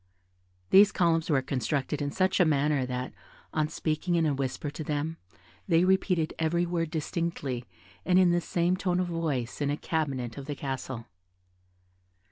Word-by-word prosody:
These 200 +1 +8
columns 165 -2 +2
were 135 -4 +2
constructed 140 +2 -1
in 145 - -1
such 190 +5 +1
a - - +7
manner 145 -4 +2
that, 125 0 -4 0.4
on 155 -1 +1
speaking 160 +2 -1
in 165 -1 +3
a 150 - +2
whisper 135 +2 -3
to 155 - -6
them, 150 +2 -2 0.5
they 165 +1 +4
repeated 185 -3 +2
every 170 +2 +1
word 170 -2 -1
distinctly, 155 -6 -3 0.4
and 180 -1 +3
in 185 -2 +6
the 175 0 +2
same 175 +1 +1
tone 180 -1 0
of 185 - +1
voice, 155 -8 -2
in 145 - +1
a 145 - 0
cabinet 140 -7 -2
of 135 - -9
the 145 - -3
castle. 130 -4 -5
155 Hz, 165 wpm, -28 LUFS, 140-175 Hz, 0.5 s, These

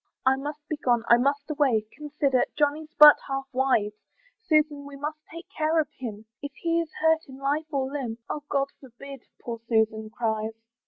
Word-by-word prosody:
"I 260 0 +5
must 295 +2 -7
be 310 - -3
gone, 240 -5 +1
I 235 - +8
must 280 +3 0
away, 265 -8 +2
"Consider, 295 -3 0
Johnny's 300 +1 0
but 300 0 +10
half 270 0 -3
wise; 235 -5 +1 0.4
"Susan, 305 -6 +1
we 285 - -10
must 300 +2 -5
take 335 +2 -10
care 315 +1 +2
of 300 -3 0
him, 220 -6 -8 0.2
"If 285 -1 -6
he 335 0 0
is 325 -2 -7
hurt 320 0 +3
in 265 - -10
life 290 +3 -2
or 275 -2 0
limb" 255 -6 -4
"Oh 300 - -4
God 275 -1 0
forbid!" 270 +1 -12
poor 235 -1 -6
Susan 220 -1 0
cries. 220 -1 -3
275 Hz, 180 wpm, -26 LUFS, 240-300 Hz, 0.4 s, but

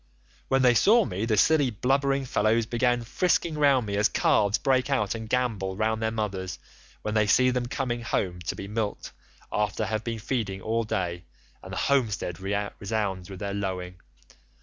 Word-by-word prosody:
When 135 0 +2
they 125 -1 +6
saw 220 - +5
me 100 +1 -3
the 110 -2 +1
silly 145 +3 +4
blubbering 135 +4 +1
fellows 110 -1 +2
began 120 +1 +1
frisking 170 +5 0
round 140 -5 +3
me 100 -1 -2
as 105 - +3
calves 100 0 +2
break 130 -1 +1
out 110 -8 +1
and 110 -1 -7
gambol 110 -7 -1
round 110 +1 0
their 110 - +1
mothers, 100 -5 -3 0.5
when 105 - -2
they 110 -1 +2
see 130 +4 +4
them 125 -1 -1
coming 120 -2 -2
home 90 -6 -2
to - - -1
be 100 - -7
milked 105 0 -3 0.4
after 105 0 -1
they 110 - -3
have 110 0 -2
been 115 0 -3
feeding 110 -4 -2
all 115 +3 -1
day, 90 -4 -3 0.4
and - - -10
the - - -5
homestead 110 -10 0
resounds 100 -1 -3
with 95 - -7
their 100 +1 -4
lowing. 90 -2 -4
110 Hz, 180 wpm, -26 LUFS, 100-125 Hz, 0.5 s, they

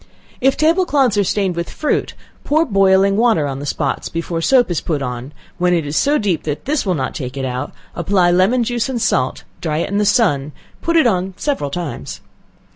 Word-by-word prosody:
If 270 +1 +3
table 335 +4 +3
cloths 265 -7 +2
are - - +4
stained 190 -2 0
with 170 0 -3
fruit, 305 - -1 0.3
pour 315 +3 +2
boiling 195 -2 +3
water 225 -10 +3
on 135 -1 -4
the 145 - -6
spots 140 -1 -2
before 165 0 -3
soap 245 +1 +3
is 170 - -1
put 155 -4 -2
on, 125 +2 -5 0.3
when 180 0 +3
it 165 -3 -1
is 145 +1 -4
so 290 - +3
deep 195 - 0
that 150 -1 -4
this 285 -6 -1
will 185 - +2
not 130 -3 -2
take 130 -1 -6
it 135 - -2
out, 130 +2 -3 0.2
apply 175 0 +2
lemon 195 +8 +3
juice 240 +2 -1
and 250 -3 -2
salt, 130 - 0 0.2
dry 155 -3 -1
it 165 - -1
in 200 +1 0
the - - +2
sun, 205 - +3
and 145 +3 -9 0.3
put 335 - 0
it 320 -5 +5
on 190 -4 0
several 275 - -1
times. 140 - -5
185 Hz, 215 wpm, -18 LUFS, 150-240 Hz, 0.3 s, it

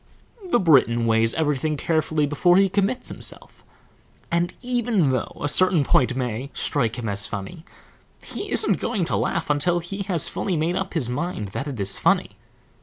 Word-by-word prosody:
The 240 - +3
Briton 125 - +3
weighs 115 0 +2
everything 150 -1 0
carefully 155 -1 0
before 175 +5 +3
he 195 0 +4
commits 200 +6 -1
himself, - - -6 0.7
and 170 +1 +1
even 240 - +1
though 130 -1 -2
a 145 - -2
certain 180 +1 +3
point 125 -1 +2
may 125 +1 -3
strike 120 -6 -1
him 120 -2 -4
as 100 0 0
funny, 100 -3 -7 0.6
he - - -7
isn't - - +2
going - - -1
to - - -1
laugh - - -1
until 155 +4 +2
he 175 +4 -5
has 170 -6 +3
fully 185 -4 -2
made 165 +3 0
up 190 -1 -4
his 145 -8 +1
mind 125 - -3
that 135 +9 -5
it 135 -6 -6
is 100 0 +2
funny. - - +2
150 Hz, 175 wpm, -23 LUFS, 125-180 Hz, 0.7 s, he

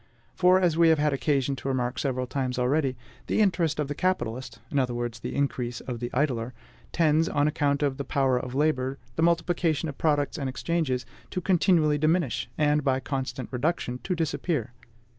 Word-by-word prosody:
For, 185 0 +5
as 175 -4 +2
we 165 0 +5
have 160 - +5
had 150 -1 +1
occasion 135 -1 +1
to - - -6
remark 125 -1 -1
several 130 -2 -1
times 130 -1 -2
already, 130 +1 +1 0.3
the - - +1
interest 170 -7 +2
of 150 - 0
the 145 - -3
capitalist 130 -9 -2
in 140 - +2
other 125 -2 0
words 120 -1 -3
the - - -5
increase 125 -4 -1
of 120 -2 -6
the 120 0 -3
idler 125 -3 -1 0.4
tends, 160 -1 +3
on 145 +1 +2
account 145 -1 +1
of 140 -2 0
the 140 - -3
power 135 -2 +1
of 125 0 -6
labor, 135 -2 +1 0.2
the - - -1
multiplication 170 -1 +1
of 140 - -9
products 145 -2 +1
and 135 -2 -2
exchanges, 130 -2 -1 0.2
to - - -3
continually 170 -4 +3
diminish, 155 -5 +1
and, 150 0 +2
by 135 -1 +2
constant 135 -2 -4
reduction, 125 -2 -1
to 180 - -2
disappear. 160 -6 -2
145 Hz, 185 wpm, -27 LUFS, 130-160 Hz, 0.4 s, For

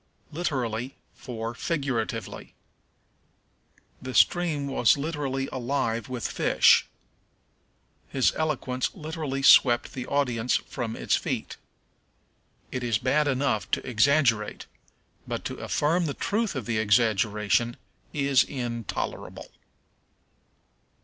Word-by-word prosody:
Literally 130 -7 -2 0.2
for 115 -2 -6
Figuratively. 135 -4 -3 1.5
"The 130 0 -6
stream 165 -5 +3
was 135 -2 +3
literally 140 -3 -2
alive 120 -3 -2
with 125 -3 -3
fish." - - +4 1.2
"His 135 -2 +2
eloquence 135 -5 -2
literally 155 -5 -4
swept 120 -3 +6
the 130 -1 -6
audience 125 -4 0
from 115 -4 -5
its - - +1
feet." - - -3 1.1
It 125 -1 -3
is 115 -3 +1
bad 150 +8 +1
enough 130 -8 0
to - - -1
exaggerate, 115 -2 +2 0.6
but - - -4
to - - -4
affirm 165 +3 0
the 140 - -3
truth 215 -3 -1
of 130 -5 -4
the 110 -1 -1
exaggeration 110 +1 +2 0.3
is 140 -3 +3
intolerable. 120 -5 -5
130 Hz, 100 wpm, -26 LUFS, 115-145 Hz, 1.5 s, swept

